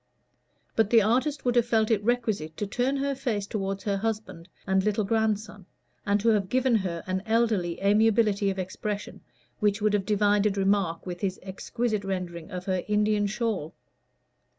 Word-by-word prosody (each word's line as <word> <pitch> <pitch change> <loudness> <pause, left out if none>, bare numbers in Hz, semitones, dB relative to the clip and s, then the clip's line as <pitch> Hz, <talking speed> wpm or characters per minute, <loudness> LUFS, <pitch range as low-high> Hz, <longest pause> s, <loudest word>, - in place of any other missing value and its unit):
But 220 -2 +3
the 230 -2 +6
artist 260 +7 0
would 245 -1 +2
have 240 -1 +3
felt 220 -1 +2
it 210 -2 +2
requisite 215 -10 -1
to 205 - -2
turn 250 +7 0
her 280 0 0
face 240 -7 -2
toward 195 -1 -3
her 200 -2 0
husband 195 -5 -4 0.2
and 190 -1 +2
little 210 +1 +1
grandson, 210 -2 -1 0.4
and 200 +1 +3
to 230 - +3
have 205 -4 +2
given 255 -2 +3
her 175 -4 -3
an 185 0 -2
elderly 220 -7 +1
amiability 210 -1 +3
of 195 - -3
expression 200 +3 -4 0.4
which 210 -1 +2
would 210 0 +1
have 195 -2 0
divided 205 -1 +2
remark 195 -4 +1
with 180 -1 -6
his 190 -2 -2
exquisite 215 +3 -2
rendering 180 -4 -4
of 180 0 -6
her 185 -2 -1
Indian 210 0 +2
shawl. 215 -7 -2
205 Hz, 170 wpm, -27 LUFS, 190-225 Hz, 0.4 s, the